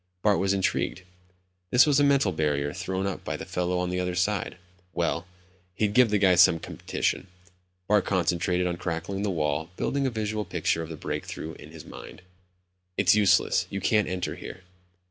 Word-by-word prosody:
Bart 105 -2 +3
was 95 0 +1
intrigued. 95 -1 -1 0.7
This 125 - +6
was 145 -2 +3
a - - +4
mental 140 -8 +3
barrier 75 -3 -1
thrown 95 +1 -3
up 100 -2 -4
by - - -3
the - - -7
fellow 90 0 -1
on 90 0 -1
the 90 - -1
other 90 -1 -2
side. 95 +2 -1 0.4
Well, 85 +1 -1 0.5
he'd 105 0 0
give 125 0 +5
the 105 - +2
guy 95 -2 +4
some 90 -1 +6
competition. 80 - -3 0.6
Bart 105 -1 +4
concentrated 90 0 0
on 90 -1 -1
cracking 85 +3 -3
the 105 - 0
wall, 75 -2 -1
building 140 -1 0
a - - +1
visual 110 -2 -2
picture 85 -3 -1
of 80 - -6
the 80 - -7
break - - -4
through 80 - -6
in 75 - -12
his 80 -2 -11
mind. - - -11 0.7
"It's 90 -2 +5
useless. 105 -2 +3
You 100 - -3
can't 105 +2 +2
enter 90 -1 -2
here." 95 - -9
90 Hz, 185 wpm, -27 LUFS, 85-105 Hz, 0.7 s, This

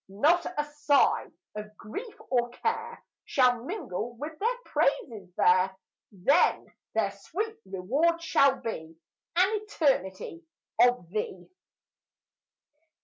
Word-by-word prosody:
Not 305 - +3
a 295 - +1
sigh 295 -1 +2 0.3
of 210 0 -8
grief 410 - -7 0.2
or 240 -2 +2
care 450 - -3 0.2
Shall 250 -3 +3
mingle 240 - -4
with 295 +6 -6
their 470 +4 +1
praises 215 - 0
there; 185 +1 +4 0.3
Then 245 - +2 0.2
their 210 -3 +2
sweet 425 - -5
reward 280 - +1
shall 275 -5 +4
be 160 -7 -5 0.4
An 390 +4 +3
eternity 295 - -1 0.4
of 245 -7 +4
thee. 185 -2 -4
250 Hz, 105 wpm, -28 LUFS, -, 0.4 s, there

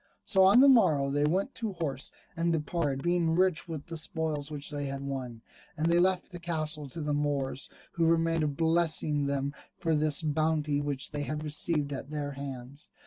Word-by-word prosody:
So 190 -3 +3
on 195 +6 +7
the 280 - +8
morrow 165 - +4
they 145 +1 +2
went 190 - 0
to 220 -4 -4
horse 140 -6 -2 0.2
and 170 0 +1
departed, 150 -3 -1
being 175 -2 +2
rich 185 -1 +2
with 155 -4 -6
the 165 -1 -6
spoils 155 -2 -2
which 150 -1 -3
they 145 -1 -3
had 135 0 -5
won: 130 -4 -5 0.3
and 160 +2 +1
they 170 - +4
left 185 +1 +1
the 175 - -8
castle 155 -3 -3
to 150 +5 -6
the 150 -1 -1
Moors, 145 -2 -1 0.2
who 165 -1 +1
remained 165 -3 +1
blessing 160 -3 +2
them 140 0 -1 0.2
for 165 - 0
this 150 0 +1
bounty 155 -1 +1
which 145 -2 -3
they 145 -1 -3
had 150 +2 -3
received 150 -1 0
at 135 0 -6
their 145 -1 -3
hands. 140 0 -7
150 Hz, 190 wpm, -29 LUFS, 140-165 Hz, 0.3 s, the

